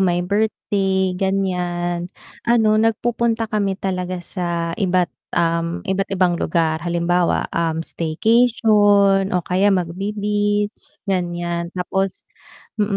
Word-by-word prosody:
may 175 -2 +1
birthday, 195 -2 0
ganyan, 180 -2 -1 0.4
ano 230 -2 +4
nagpupunta 225 +1 +1
kami 200 -2 0
talaga 185 -2 -3
sa 170 -2 -2
iba't, 180 -2 +1 0.2
um, 170 +2 0
iba't 195 0 -1
ibang 180 -3 +1
lugar 160 -1 0
halimbawa, 175 0 +1
um, 165 -1 -1
staycation 205 +1 +3
o 175 - -2
kaya 190 +3 +2
mag-be-beach 205 +3 0 0.3
ganyan. 175 -2 -2
Tapos, 190 +1 -2 0.6
mm, 205 -1 +1
190 Hz, 100 wpm, -20 LUFS, 175-205 Hz, 0.6 s, ano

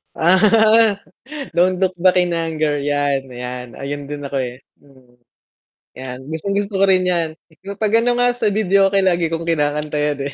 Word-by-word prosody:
Ah. 215 +4 +4 0.6
Don't 180 +1 +2
look 185 -1 0
back 185 -1 +4
in 175 -1 +1
anger, 155 -3 -1
yan, 140 -2 -1
'yan. 125 0 -7
Ayun 145 +1 -6
din 145 -1 -5
ako 140 0 -3
eh. 125 0 -6 0.2
Mm. 130 -3 -23 0.8
'Yan, 130 -1 -7
gustong 160 +5 -3
gusto 205 0 -2
ko 195 - +5
rin 185 -1 +4
'yan 170 -3 0 0.5
'pag 215 +1 +3
ano 245 +1 +1
nga 245 - +4
sa 240 -3 -2
videoke, 195 -1 +2
lagi 175 -3 +1
kong 165 +1 -3
kinakanta 150 -1 -1
'yan 150 -1 -1
eh. - - -12
165 Hz, 170 wpm, -19 LUFS, 145-195 Hz, 0.8 s, ko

